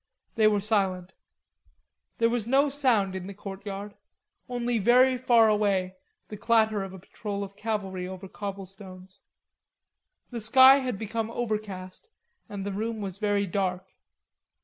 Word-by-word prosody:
They 220 -1 +4
were 205 -1 +2
silent. 190 -4 0 1.0
There 230 - +3
was 235 -2 -2
no 275 +3 +3
sound 245 -9 +2
in 185 0 -5
the 200 - -8
courtyard, 200 +1 -7 0.6
only 240 -1 -1
very 250 +5 +5
far 240 -3 +4
away 200 -3 +1 0.3
the 210 - -7
clatter 220 -1 +2
of 195 -1 -6
a 190 - -9
patrol 200 +2 -6
of 200 0 -9
cavalry 200 -4 -3
over 190 +1 -8
cobblestones. 190 -1 -9 1.1
The 235 -2 -4
sky 260 +5 +7
had 255 -6 -3
become 220 +1 -3
overcast 215 - -5 0.4
and 200 -2 -6
the 200 - -3
room 220 +2 -3
was 195 -1 -5
very 205 -1 +1
dark. 185 0 -3
205 Hz, 140 wpm, -27 LUFS, 195-230 Hz, 1.1 s, sky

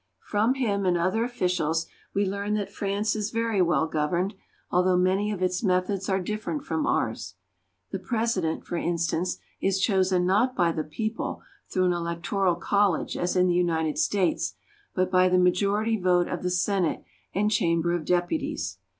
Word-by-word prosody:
From 220 +5 +1
him 210 -7 0
and 180 -2 +2
other 185 +6 +1
officials 180 -9 0 0.3
we 200 +1 +1
learn 200 +2 -2
that 205 -2 -3
France 205 +2 -1
is 210 -1 -2
very 230 -3 0
well 170 -2 +3
governed, 170 +5 -1 0.4
although 180 0 +3
many 190 +3 +2
of 190 -3 -3
its 180 0 0
methods 190 -1 0
are 190 0 +2
different 215 - -3
from 310 -2 -1
ours. - - -1 0.6
The - - -3
President, 220 -9 -1
for 175 - -3
instance, 170 +1 -1 0.2
is 195 0 +2
chosen 190 -3 +2
not 215 +8 +2
by 175 -2 +3
the 160 -1 -2
people 215 +9 -4 0.3
through 185 -1 +2
an 180 - +3
electoral 175 +2 0
college 200 +1 +1
as 175 +1 -1
in 180 0 +4
the 180 - +2
United 160 -3 +1
States, 195 -4 +1 0.4
but 185 0 +1
by 185 0 +5
the 180 - +3
majority 200 +5 +2
vote 180 -1 +3
of 180 - -4
the 180 - -1
Senate 180 -1 0 0.3
and 210 +2 +2
Chamber 170 -4 +2
of 175 -2 -1
Depu 175 - +1
ties. - - -4
185 Hz, 170 wpm, -26 LUFS, 175-205 Hz, 0.6 s, by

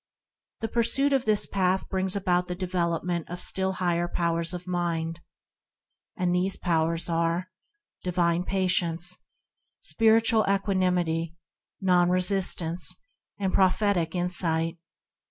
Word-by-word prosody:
The 225 - -1
pursuit 240 +5 +2
of 265 -2 +1
this 215 -1 +2
Path 190 -1 -1
brings 190 0 -1
about 180 -2 0
the 180 - -4
development 175 -2 -2
of 175 +1 -6
still 190 +1 +1
higher 175 -2 -1
powers 170 -1 -1
of 180 0 -5
mind, 170 -2 -3 1.0
and 180 -1 0
these 185 +2 +1
powers 165 -1 0
are 170 +2 -1 0.5
divine 175 -1 0
patience, 180 -2 0 0.6
spir 225 0 +3
itual 225 -2 +2
equanimity, 180 -5 0 0.4
non 180 -2 +3
resistance, 180 - +1 0.3
and 190 -2 -2
pro 190 - +5
phetic 185 -4 -1
insight. 170 -2 +3
180 Hz, 120 wpm, -26 LUFS, 170-190 Hz, 1.0 s, pro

